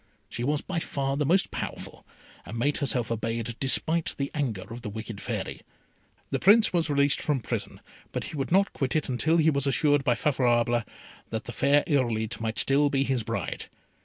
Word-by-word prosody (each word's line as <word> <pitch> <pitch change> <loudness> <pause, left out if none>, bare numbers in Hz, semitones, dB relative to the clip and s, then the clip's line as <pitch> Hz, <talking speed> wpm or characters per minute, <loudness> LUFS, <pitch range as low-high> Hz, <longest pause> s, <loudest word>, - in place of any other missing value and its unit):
She 120 - -5
was 145 +3 0
by 185 -3 -3
far 135 -3 -2
the 145 0 0
most 190 +5 +3
powerful, - - -6 0.4
and 110 - -7
made 145 +5 +1
herself 125 -5 -1
obeyed 115 0 -2
despite 160 +4 +1
the 140 0 -2
anger 120 -11 -2
of 120 - -8
the 110 - -5
wicked 110 0 -7
Fairy. - - -4 0.7
The - - 0
Prince 210 +3 +5
was 165 -3 +1
released 140 0 +3
from 145 -3 0
prison; 115 - -4 0.3
but - - -3
he - - -7
would 135 +1 -3
not 195 +2 +3
quit 135 0 -2
it 155 -2 0
until 155 +7 +2
he 160 -1 +4
was 140 -1 -1
assured 145 +1 +3
by 125 -2 +2
Favourable 120 -3 +2 0.5
that 110 -1 -3
the - - -7
fair 140 +5 +3
Irolite 115 -7 0
might 110 0 -2
still 145 +1 +4
be 135 -1 +1
his 130 -3 0
bride. 115 +1 -4
135 Hz, 190 wpm, -27 LUFS, 120-150 Hz, 0.7 s, Prince